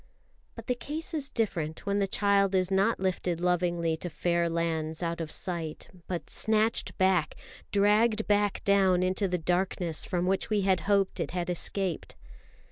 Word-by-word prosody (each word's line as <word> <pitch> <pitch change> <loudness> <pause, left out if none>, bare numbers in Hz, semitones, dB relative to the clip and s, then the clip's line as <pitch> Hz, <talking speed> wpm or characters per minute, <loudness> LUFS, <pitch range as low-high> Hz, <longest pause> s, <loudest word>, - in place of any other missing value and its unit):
But - - -9
the 250 - 0
case 300 +7 -6
is 295 -3 -3
different 165 -9 -2
when 200 0 0
the 200 - +1
child 200 -1 +2
is 185 0 +1
not 195 +4 +2
lifted 185 -2 -1
lovingly 175 -2 0
to 175 - -5
fair 170 +1 0
lands 160 -1 -2
out 170 0 -2
of 160 - -4
sight, 165 -3 -4 0.2
but 170 -5 -4
snatched 220 +1 +2
back, 185 -4 +2 0.4
dragged 215 +2 +3
back 205 -1 +1
down 190 -2 +3
into 185 +2 0
the 180 -1 -1
darkness 175 -1 0
from 180 -2 -1
which 190 +1 0
we 210 -2 +1
had 190 -2 +2
hoped 200 -2 +2
it - - -2
had 175 0 -1
escaped. 180 0 -3
185 Hz, 165 wpm, -28 LUFS, 170-200 Hz, 0.4 s, dragged